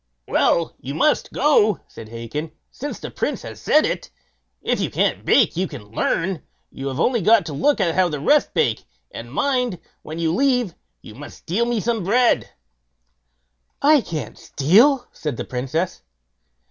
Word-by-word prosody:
"Well, 165 Hz, -1 st, +2 dB
you 140 Hz, +3 st, -6 dB
must 300 Hz, -, +1 dB
go", 220 Hz, -, +3 dB
said 110 Hz, -1 st, -11 dB
Hacon, 120 Hz, +8 st, -6 dB, 0.2 s
"since 290 Hz, +2 st, -6 dB
the -, -, -7 dB
Prince -, -, -3 dB
has -, -, -9 dB
said 305 Hz, -, +4 dB
it. -, -, -3 dB, 0.5 s
If -, -, 0 dB
you -, -, -1 dB
can't -, -, 0 dB
bake, 235 Hz, -10 st, +3 dB
you 185 Hz, +3 st, 0 dB
can 105 Hz, -10 st, -11 dB
learn; 165 Hz, +8 st, -1 dB, 0.3 s
you 135 Hz, -, -6 dB
have 135 Hz, +1 st, -4 dB
only 235 Hz, +4 st, +2 dB
got 215 Hz, +3 st, +4 dB
to 155 Hz, -, -5 dB
look 285 Hz, -, +2 dB
how 180 Hz, -1 st, +2 dB
the 150 Hz, -3 st, -4 dB
rest 295 Hz, -, +2 dB
bake; -, -, +1 dB, 0.3 s
and -, -, -9 dB
mind, 250 Hz, -8 st, 0 dB, 0.2 s
when 155 Hz, +1 st, -8 dB
you 165 Hz, -1 st, 0 dB
leave, 250 Hz, -5 st, +1 dB, 0.3 s
you 110 Hz, -, -11 dB
must 145 Hz, +6 st, -11 dB
steal 225 Hz, +8 st, -1 dB
me 240 Hz, -2 st, 0 dB
some 225 Hz, -1 st, -1 dB
bread." 235 Hz, +6 st, +2 dB, 1.3 s
"I 295 Hz, -1 st, +5 dB
can't 155 Hz, -, -6 dB
steal", 225 Hz, -, +3 dB
said 150 Hz, -6 st, -5 dB
the -, -, -4 dB
Princess. 135 Hz, +8 st, -3 dB
180 Hz, 165 wpm, -21 LUFS, 150-245 Hz, 1.3 s, I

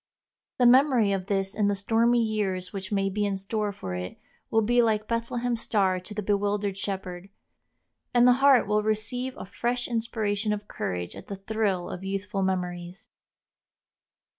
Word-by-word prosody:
The 250 Hz, -, +3 dB
memory 250 Hz, -4 st, +5 dB
of 195 Hz, -1 st, -2 dB
this 195 Hz, -1 st, 0 dB
in 210 Hz, -2 st, +1 dB
the 205 Hz, -, +1 dB
stormy 230 Hz, +4 st, +2 dB
years 195 Hz, -4 st, -2 dB
which 190 Hz, -1 st, -6 dB
may 195 Hz, -1 st, +1 dB
be 205 Hz, +2 st, -1 dB
in 200 Hz, -1 st, 0 dB
store 205 Hz, +2 st, -2 dB
for 95 Hz, -, -6 dB
it 90 Hz, 0 st, -5 dB, 0.3 s
will 225 Hz, 0 st, +3 dB
be 240 Hz, +3 st, +4 dB
like 215 Hz, -2 st, +1 dB
Bethlehem's 235 Hz, 0 st, -1 dB
star 190 Hz, -4 st, +1 dB
to 185 Hz, +4 st, -10 dB
the 210 Hz, -, -3 dB
bewildered 205 Hz, 0 st, 0 dB
shepherd, 190 Hz, -1 st, -5 dB, 0.8 s
and 245 Hz, 0 st, +5 dB
the -, -, +8 dB
heart 275 Hz, -4 st, +6 dB
will 210 Hz, +1 st, +2 dB
receive 225 Hz, +4 st, -2 dB
a -, -, -7 dB
fresh 240 Hz, +5 st, -2 dB
inspiration 220 Hz, -3 st, -1 dB
of 210 Hz, 0 st, -5 dB
courage 90 Hz, -1 st, -4 dB
at -, -, -11 dB
the 200 Hz, -, -5 dB
thrill 195 Hz, -2 st, -1 dB
of 180 Hz, -, -6 dB
youthful 195 Hz, +1 st, -3 dB
memories. 180 Hz, -1 st, -3 dB
205 Hz, 165 wpm, -27 LUFS, 195-225 Hz, 0.8 s, the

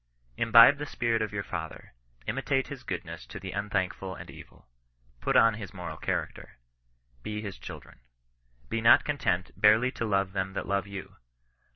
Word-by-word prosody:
Imbibe 115 Hz, -, +7 dB
the 145 Hz, -, -4 dB
spirit 115 Hz, -4 st, 0 dB
of 110 Hz, -, -2 dB
your 100 Hz, -1 st, -3 dB
Father. -, -, -7 dB, 0.3 s
Imitate 135 Hz, +2 st, -1 dB
his 140 Hz, -3 st, -7 dB
goodness 90 Hz, -6 st, -6 dB
to 100 Hz, -, -8 dB
the 95 Hz, 0 st, -6 dB
unthankful 95 Hz, -2 st, -2 dB
and -, -, -10 dB
evil. -, -, -15 dB, 0.5 s
Put -, -, -1 dB
on 115 Hz, -1 st, +6 dB
his 105 Hz, -4 st, -8 dB
moral -, -, -6 dB
character. -, -, -4 dB, 0.6 s
Be 105 Hz, +9 st, -4 dB
his 100 Hz, -3 st, -7 dB
children. -, -, -10 dB, 0.7 s
Be 115 Hz, -, -2 dB
not 115 Hz, -, +6 dB
content 95 Hz, -11 st, -1 dB
barely 110 Hz, +4 st, +4 dB
to 115 Hz, -, -4 dB
love 100 Hz, -3 st, 0 dB
them 95 Hz, 0 st, -2 dB
that 95 Hz, -, -3 dB
love 100 Hz, 0 st, 0 dB
you. 100 Hz, -1 st, -8 dB
105 Hz, 165 wpm, -28 LUFS, 95-115 Hz, 0.7 s, Imbibe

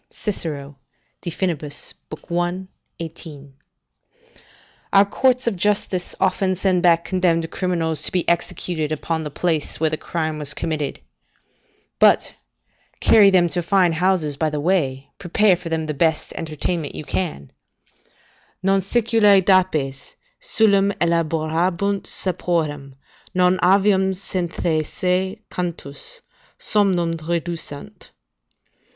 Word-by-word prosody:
Cicero, 145 Hz, -9 st, -5 dB, 0.4 s
De 175 Hz, -, -4 dB
Finib., 170 Hz, -2 st, -1 dB
i. 175 Hz, +4 st, -4 dB, 0.3 s
18.] 155 Hz, -4 st, -9 dB, 1.4 s
Our 195 Hz, 0 st, +6 dB
courts 255 Hz, +5 st, +2 dB
of 235 Hz, -4 st, +1 dB
justice 190 Hz, -1 st, 0 dB
often 185 Hz, 0 st, +1 dB
send 185 Hz, -1 st, +1 dB
back 170 Hz, -1 st, +4 dB
condemned 170 Hz, -3 st, +1 dB
criminals 165 Hz, -4 st, -1 dB
to -, -, 0 dB
be 180 Hz, -2 st, 0 dB
executed 170 Hz, -2 st, -1 dB
upon 160 Hz, +1 st, -2 dB
the 150 Hz, -, -4 dB
place 160 Hz, 0 st, -1 dB
where 160 Hz, -1 st, +1 dB
the 155 Hz, -, -1 dB
crime 155 Hz, -2 st, -3 dB
was 150 Hz, 0 st, -5 dB
committed; 150 Hz, -4 st, -3 dB, 1.0 s
but, -, -, +4 dB, 0.7 s
carry 210 Hz, -3 st, +6 dB
them 180 Hz, -2 st, +4 dB
to 175 Hz, +1 st, -1 dB
fine 180 Hz, -1 st, +3 dB
houses 165 Hz, -4 st, +1 dB
by 160 Hz, +1 st, +1 dB
the 150 Hz, -1 st, -3 dB
way, 145 Hz, -5 st, 0 dB
prepare 195 Hz, +2 st, +3 dB
for 175 Hz, -1 st, -8 dB
them 160 Hz, -1 st, -1 dB
the 155 Hz, -, -3 dB
best 160 Hz, +2 st, 0 dB
entertainment 160 Hz, 0 st, -3 dB
you -, -, -5 dB
can 150 Hz, -, -3 dB, 1.1 s
"Non 195 Hz, 0 st, +3 dB
Siculae 215 Hz, -1 st, +4 dB
dapes 155 Hz, -8 st, +1 dB, 0.3 s
Dulcem 200 Hz, -, +3 dB
elaborabunt 170 Hz, +4 st, 0 dB
saporem: 155 Hz, -7 st, -2 dB, 0.4 s
Non 180 Hz, 0 st, +3 dB
avium 190 Hz, 0 st, +3 dB
cyatheaceae 180 Hz, +2 st, -2 dB
cantus 180 Hz, -, -5 dB, 0.4 s
Somnum 185 Hz, -5 st, +2 dB, 0.2 s
reducent." 170 Hz, -3 st, -4 dB
175 Hz, 110 wpm, -21 LUFS, 155-190 Hz, 1.4 s, Our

